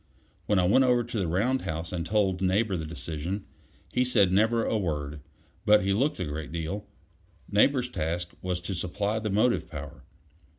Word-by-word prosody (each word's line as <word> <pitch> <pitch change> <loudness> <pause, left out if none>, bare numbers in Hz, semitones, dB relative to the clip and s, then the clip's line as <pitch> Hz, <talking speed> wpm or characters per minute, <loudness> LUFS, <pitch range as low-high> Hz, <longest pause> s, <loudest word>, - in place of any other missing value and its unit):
When 105 - +3
I 90 - +4
went 105 +9 +5
over 125 -2 +3
to 115 -2 -4
the 95 - 0
round 115 +10 +1
house 80 -2 -4
and 85 -2 -2
told 95 0 +1
Neighbor 95 +2 +2
the 80 -3 -4
decision, 85 +4 -4 0.5
he 125 - +3
said 110 -7 +3
never 110 +4 +3
a - - 0
word; 75 -7 -2 0.4
but 105 -1 +5
he 100 0 +1
looked 135 +7 +1
a 90 - -1
great 75 0 -5
deal. 85 +5 -4 0.6
Neighbor's 125 +5 +3
task 85 -4 -3
was 90 -1 -2
to 90 +3 -4
supply 100 +5 -1
the 110 -1 -3
motive 110 -1 +2
power. 75 -3 -8
95 Hz, 180 wpm, -28 LUFS, 85-110 Hz, 0.6 s, went